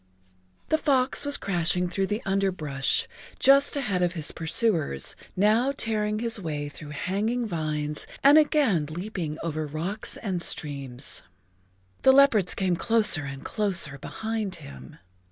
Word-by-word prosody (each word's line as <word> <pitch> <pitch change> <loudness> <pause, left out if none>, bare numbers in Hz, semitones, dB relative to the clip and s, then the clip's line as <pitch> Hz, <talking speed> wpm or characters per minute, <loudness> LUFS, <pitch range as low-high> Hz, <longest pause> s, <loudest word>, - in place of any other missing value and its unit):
The 315 - +2
fox 270 -2 +2
was 285 - +5
crashing 180 -1 +1
through 190 +2 -1
the[Pg 210 +4 -3
21] 195 - -2
underbrush 160 -9 0 0.3
just 275 +2 +4
ahead 215 -10 -1
of 175 0 +1
his 160 -4 -2
pursuers, 160 - +1 0.2
now 220 +7 +3
tearing 215 -1 -1
his 230 -1 -3
way 150 -4 -4
through 145 +1 -11
hanging 205 - -2
vines 150 -5 -3 0.2
and 285 +3 +8
again 265 - +2
leaping 170 -1 -5
over 155 -2 -3
rocks 170 +9 -4
and 190 -5 -3
streams. 140 -5 -1 0.8
The 265 - +6
leopards 250 -10 +4
came 185 -2 0
closer 210 -7 +2
and 140 -1 -8
closer 180 -9 -1
behind 220 +2 -4
him. 65 - -12
185 Hz, 135 wpm, -26 LUFS, 155-225 Hz, 0.8 s, and